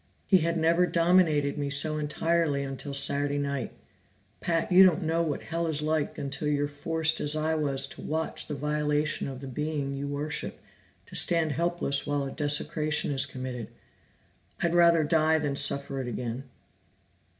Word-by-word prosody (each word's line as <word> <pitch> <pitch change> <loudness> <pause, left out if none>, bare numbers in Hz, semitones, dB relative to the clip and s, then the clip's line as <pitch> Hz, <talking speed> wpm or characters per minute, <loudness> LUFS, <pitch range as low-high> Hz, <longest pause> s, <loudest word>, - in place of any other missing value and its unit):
"He 190 - +5
had 170 +1 0
never 170 +2 +3
dominated 165 -5 +2
me 140 -1 -2
so 155 +2 +1
entirely 150 -1 0
until 140 +1 -5
Saturday 145 +1 +1
night 140 -2 -2 0.7
Pat, 165 +1 -1
you 180 +1 +8
don't 185 -1 +5
know 165 +1 +1
what 155 -4 -2
Hell 165 0 -2
is 155 -1 0
like 155 -1 -1
until 140 +2 -4
you're 145 -1 +1
forced 160 +2 -1
as 150 +1 +1
I 155 +1 0
was 140 -3 -1
to - - -11
watch 160 +1 -3
the 150 - -4
violation 150 +1 -1
of 135 -1 -7
the 135 - -7
being 145 +1 -3
you 140 +1 -4
worship, 150 +2 -4 0.5
to - - -12
stand 165 -3 +2
helpless 170 -2 -1
while 145 -1 0
a 135 - -5
desecration 150 0 0
is 140 0 +2
committed. 130 -4 -6 0.9
I'd 170 -1 +1
rather 170 -2 +5
die 160 +1 +3
than 145 -3 -2
suffer 140 -1 0
it 125 - -5
again!" 120 +2 -4
150 Hz, 165 wpm, -28 LUFS, 140-160 Hz, 0.9 s, you